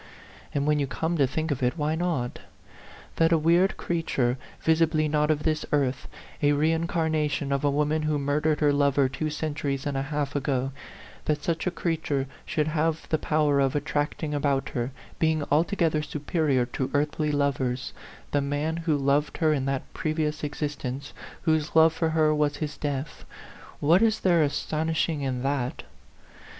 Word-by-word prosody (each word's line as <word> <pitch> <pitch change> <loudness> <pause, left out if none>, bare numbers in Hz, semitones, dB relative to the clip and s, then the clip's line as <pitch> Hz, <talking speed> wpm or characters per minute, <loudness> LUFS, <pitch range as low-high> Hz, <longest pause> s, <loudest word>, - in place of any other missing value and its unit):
And 140 -1 -1
when 150 0 +2
you 140 - 0
come 160 +5 -2
to 135 - +4
think 155 +4 -2
of 135 - -2
it, 125 +5 +1
why 150 0 0
not? 160 -7 -1 0.8
That 165 0 +4
a 165 - +5
weird 170 +4 +3
creat 170 -2 -3
ure, 125 -1 +2 0.2
visibly 160 -1 +2
not 150 0 +1
of 150 -1 +1
this 155 -1 0
earth, 135 -2 0 0.3
a 145 0 +4
reincarnation 155 -2 0
of 140 0 0
a 145 - +3
woman 150 +2 +1
who 155 -1 0
murdered 150 +2 0
her 145 -1 +4
lover 140 -1 +3
two 145 +4 -3
centuries 150 -3 -3
and 145 -1 -2
a 135 - 0
half 145 0 -3
ago, 135 -2 0 0.5
that 150 -1 0
such 165 +1 -1
a - - +4
creature 155 -6 -1 0.2
should 155 0 0
have 160 +1 0
the 155 - +1
power 150 -2 +2
of 135 0 +2
attracting 150 +1 -1
about 140 -2 0
her 120 -1 -2 0.3
(being 160 -2 +2
altogether 160 0 +2
superior 150 -3 0
to 130 +1 -3
earthly 150 +1 +1
lovers) 135 -3 -1 0.4
the 145 - +2
man 145 +3 -1
who 165 -3 +1
loved 140 +2 +1
her 155 -2 +3
in 135 -3 -1
that 135 -1 -1
pre 155 -1 -2
vious 155 -1 -1
existence, 145 -2 -4 0.3
whose 160 -1 +1
love 160 0 +6
for 165 0 0
her 155 -1 +3
was 150 -1 +1
his 150 -1 -4
death 145 0 -4 0.6
what 165 +7 +4
is 225 -1 +2
there 175 -3 +4
astonishing 155 +1 0
in 130 -2 -2
that? 135 -2 -1
150 Hz, 170 wpm, -26 LUFS, 140-160 Hz, 0.8 s, love